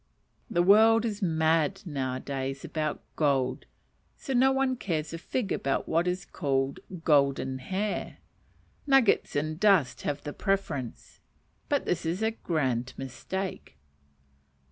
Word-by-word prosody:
The 175 - +2
world 220 +4 +6
is 210 -2 -3
mad 165 +2 +1
now 135 -6 -2
a - - -4
days 135 0 -4
about 155 -2 -3
gold, 135 -4 0 0.5
so 270 - -4
no 260 +2 +5
one 265 -1 +1
cares 165 -9 -3
a 165 - -5
fig 210 +3 -3
about 135 - -1
what 165 +2 +1
is 180 +1 -2
called 135 -4 -1 0.2
"golden 140 -3 +2
hair:" 195 +9 -3 0.7
nuggets 270 -6 +3
and 155 +2 -1
dust 195 -10 +3
have 145 0 -3
the 145 - -5
preference; 170 - -3 0.5
but 285 -2 +1
this 180 - -1
is 170 +6 -2
a 220 - +2
grand 130 - -2
mistake. 135 - -5
160 Hz, 135 wpm, -28 LUFS, 140-200 Hz, 0.7 s, world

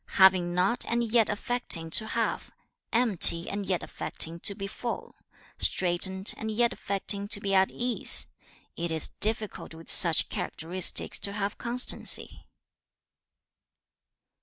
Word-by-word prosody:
3. - - -10
'Having 185 -2 +2
not 190 +7 -2
and 235 -1 -4
yet 230 -3 +2
affecting 210 -7 +2
to 220 - +4
have, 230 0 -5 0.4
empty 205 -8 +6
and 200 -1 -7
yet 180 -2 -3
affecting 165 +1 -1
to 200 - -1
be 195 - -8
full, 235 +4 -8 0.5
straitened 190 +2 0
and 220 - -7
yet 235 +2 -1
affecting 200 0 -4
to 205 0 +4
be 200 -1 -5
at 190 0 +1
ease: 245 0 +2 0.5
it 170 0 -6
is 160 -1 +1
difficult 215 -6 -1
with 165 0 -10
such 165 -3 +2
characteristics 175 +3 -1
to 200 - -3
have 205 0 -6
constancy.' 245 +1 0
200 Hz, 135 wpm, -25 LUFS, 180-225 Hz, 0.5 s, empty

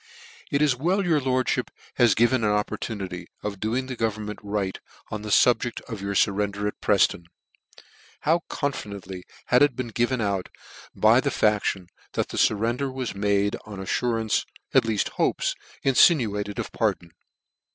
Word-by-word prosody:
Cf - - -20
It 140 - +2
is 145 -4 +3
well 180 +9 0
your 160 -4 +2
lordfhip 130 -1 0 0.3
has 120 -5 +4
given 120 +1 +3
an 105 - +3
oppor 105 0 0
tunity 95 -5 -5 0.2
of 100 -2 -4
doing 120 +5 -1
the 130 -1 -5
government 110 -2 -3
right, 100 -2 -3 0.3
on 105 - -4
the 105 - -6
fub 120 +3 +5
ject 120 - -4
of 110 -5 -8
your 100 0 -3
furrender 100 +1 +1
at 105 - -6
Prefton, 95 -4 +2 0.5
ff - - -17 0.4
How 160 +4 +3
confidently 100 - -4 0.2
had 125 - +5
it 145 -3 +4
been 125 -1 -4
given 120 +3 0
out 100 -4 -1 0.5
by - - +5
the - - 0
faction, 105 -3 +1 0.3
that - - -1
the - - -6
furrender 120 +6 +1
was 130 -2 -4
made 100 0 +1
on 105 -2 -9
alTur 115 +4 -1
ances, 110 - +1 0.3
aUeaft 110 -3 +2
hopes, - - 0 0.3
infinuated 110 - +3
of - - -4
pardon. 85 -1 -1
110 Hz, 165 wpm, -25 LUFS, 100-125 Hz, 0.5 s, fub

